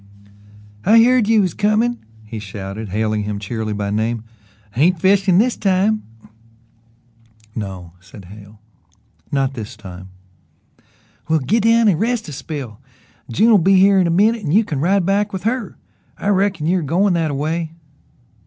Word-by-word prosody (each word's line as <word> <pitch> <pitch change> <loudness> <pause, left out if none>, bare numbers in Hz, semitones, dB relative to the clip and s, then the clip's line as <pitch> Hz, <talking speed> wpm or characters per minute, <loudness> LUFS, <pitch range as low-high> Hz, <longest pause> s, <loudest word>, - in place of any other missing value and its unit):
"I 225 +4 +6
heard 250 -2 +3
you 225 -1 +4
was 185 -4 -1
comin'," 220 +3 +1 0.2
he 110 +1 -7
shouted, 100 +1 -7
hailing 110 +2 -1
him 105 0 -4
cheerily 110 +1 -4
by 100 -1 -3
name. 110 +2 -1 0.5
"Ain't 165 +7 +2
fishin' 190 0 +3
this 240 +4 +2
time!" 200 +2 +1 1.5
"No," 95 -6 -7
said 95 +1 -14
Hale, 100 +2 -14 0.7
"not 135 -1 0
this 115 -2 -8
time." 95 -2 -11 1.2
"Well, 160 - +3
git 205 - 0
down 230 0 +4
and 175 -6 +2
rest 230 -1 -1
a - - -7
spell. 135 -6 -7 0.5
June'll 215 - +4
be 195 +3 +3
here 195 +1 +5
in 180 - +2
a - - 0
minute 210 +6 +2
an' 150 - -2
you 210 +6 +4
can 150 -8 -3
ride 185 +4 +1
back 200 +2 +1
with 190 -2 -6
her. 230 -1 -2 0.4
I 200 - -2
reckon 195 -5 +1
you 180 +3 +2
air - - -1
goin' 180 +6 +1
that 165 -2 0
a 145 - -3
way." 160 +3 -3
165 Hz, 160 wpm, -19 LUFS, -, 1.5 s, I